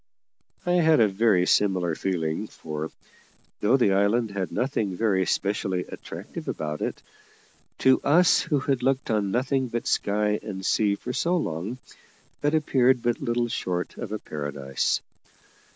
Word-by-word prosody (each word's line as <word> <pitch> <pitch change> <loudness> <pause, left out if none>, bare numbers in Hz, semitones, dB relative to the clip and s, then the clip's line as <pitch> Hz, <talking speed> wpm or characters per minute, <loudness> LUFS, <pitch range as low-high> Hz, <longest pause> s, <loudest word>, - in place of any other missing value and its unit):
I 175 - +1
had 160 -4 +4
a 110 - +6
very 95 -2 +3
similar 90 -4 +2
feeling; 85 +2 -2
for, 80 -3 -6 0.7
though 115 +6 +3
the 100 -7 +3
island 100 +3 +2
had 95 -2 -3
nothing 115 -7 -1
very 95 -5 +1
specially 100 -2 0
attractive - - -8
about 75 -1 -3
it, - - -3 0.7
to 130 0 +4
us 165 +4 +5
who 150 -5 0
had 135 -2 0
looked 130 -1 0
on 105 -2 +1
nothing 130 +4 0
but 120 0 -3
sky 105 +1 +1
and 95 -3 -6
sea 105 -2 +2
for 125 - -6
so 175 +6 +1
long, 95 - -3 0.6
it 145 +2 +2
appeared 130 -5 +3
but 120 +6 0
little 120 -2 0
short 90 -5 -3
of - - -5
a 110 - -1
paradise. 70 -6 -2
105 Hz, 150 wpm, -26 LUFS, 95-130 Hz, 0.7 s, a